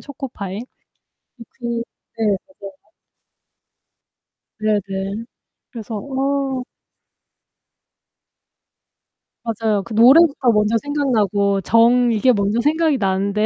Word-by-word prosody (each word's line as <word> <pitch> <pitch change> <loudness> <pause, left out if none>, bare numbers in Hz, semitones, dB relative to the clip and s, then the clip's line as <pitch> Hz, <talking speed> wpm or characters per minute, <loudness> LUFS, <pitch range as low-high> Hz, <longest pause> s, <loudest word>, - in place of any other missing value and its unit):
초코파이. 255 -9 -7
이 240 +4 -11 0.8
그 235 -1 -3 0.4
네 225 - +1 0.5
맞아요. 190 - -33 1.7
네네. 205 0 -2 0.5
그래서 225 -2 -7
어 270 +1 -2 2.8
맞아요. 220 -3 -1
그 225 - -9
노래부터 265 +3 +5
먼저 210 +2 +2
생각나고 210 -9 0
정 235 +4 +4
이게 235 +4 +3
먼저 205 +1 0
생각이 310 +1 +1
나는데 200 0 0
230 Hz, 185 characters per minute, -19 LUFS, 205-265 Hz, 2.8 s, 노래부터